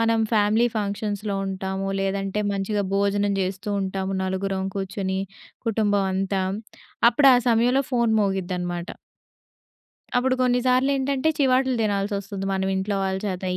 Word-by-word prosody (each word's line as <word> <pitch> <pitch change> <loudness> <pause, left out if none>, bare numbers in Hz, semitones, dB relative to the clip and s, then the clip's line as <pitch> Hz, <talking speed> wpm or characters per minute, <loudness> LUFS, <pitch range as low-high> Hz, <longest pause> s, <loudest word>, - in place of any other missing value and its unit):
మనం 230 0 +2
ఫ్యామిలీ 215 +2 +3
ఫంక్షన్స్‌లో 205 0 -2
ఉంటాము, 190 0 -3
లేదంటే 195 +1 -1
మంచిగా 200 +1 -1
భోజనం 200 0 +1
జేస్తూ 190 +2 -3
ఉంటాము 190 0 -2
నలుగురం 190 0 -2
కూర్చొని 190 0 -2 0.5
కుటుంబం 205 -3 +2
అంతా. 195 0 0 0.7
అప్పుడు 275 +3 +5
ఆ - - +6
సమయంలో 245 +4 +3
ఫోను 235 -2 +2
మోగిద్దనమాట. 180 -3 -2 1.3
అప్పుడు 255 +1 +2
కొన్ని 250 0 +2
సార్లేంటంటే, 270 +3 +2
చివాట్లు 260 -1 +3
దినాల్సొస్తుంది 200 -1 -2
మనం 190 0 0
ఇంట్లో 195 +1 -1
వాళ్ళ 190 0 -1
చేత. 185 -2 -3
200 Hz, 120 wpm, -24 LUFS, 190-225 Hz, 1.3 s, ఆ